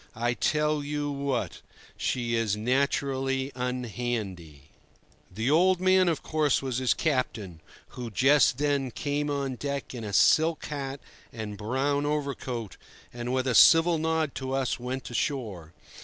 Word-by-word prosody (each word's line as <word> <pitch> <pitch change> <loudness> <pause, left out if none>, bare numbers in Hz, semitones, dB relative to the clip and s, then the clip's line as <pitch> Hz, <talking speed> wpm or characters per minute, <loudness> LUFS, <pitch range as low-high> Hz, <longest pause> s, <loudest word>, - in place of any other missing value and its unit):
I 120 +2 0
tell 150 +3 0
you 145 0 -2
what: 140 -3 -3 0.3
she 120 -2 -2
is 115 -3 0
naturally 135 +2 0
unhandy." 120 - -4 0.6
The 110 +8 -1
"old 180 +3 +4
man," 185 -1 +4
of 165 - -2
course, 155 -3 +1
was 130 -2 -2
his 130 -1 +2
captain, 110 - -2 0.3
who 120 -2 -7
just 130 +4 +4
then 140 -2 0
came 145 +3 -2
on 140 -3 -2
deck 140 0 -4
in 120 -3 -6
a 105 - -5
silk 160 +10 +3
hat 140 -2 -5 0.3
and 110 -3 -6
brown 135 +7 -1
overcoat, 135 - -3 0.4
and, 120 0 -4
with 130 0 0
a 130 - +1
civil 165 - +6
nod 160 -2 0
to 130 0 -4
us, 135 -1 -1
went 125 +2 -5
ashore. 110 - -3
135 Hz, 140 wpm, -27 LUFS, 120-145 Hz, 0.6 s, civil